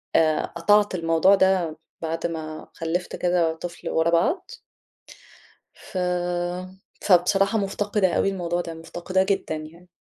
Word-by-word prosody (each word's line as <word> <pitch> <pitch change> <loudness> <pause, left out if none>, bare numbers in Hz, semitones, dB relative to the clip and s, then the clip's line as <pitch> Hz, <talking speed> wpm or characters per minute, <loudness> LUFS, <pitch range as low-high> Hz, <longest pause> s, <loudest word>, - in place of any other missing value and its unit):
آآ 155 -1 +3
قطعت 205 +4 +2
الموضوع 165 +3 +4
ده، 185 -5 +2 0.2
بعد 165 0 -2
ما 155 -2 -6
خلِّفت 170 +2 -3
كذا 175 -2 +1
طفل 170 +2 -7
ورا 160 +1 +2
بعض. 340 - +1 1.2
ف - - -10 1.0
فبصراحة 195 +3 +3
مُفتقِدة 200 -1 0
أوي - - +2
الموضوع 175 -2 -2
ده، 165 -1 -6
مُفتقِداه 175 +3 -1
جدًا 195 -4 -1
يعني. 160 +3 -10
175 Hz, 120 wpm, -24 LUFS, 165-195 Hz, 1.2 s, الموضوع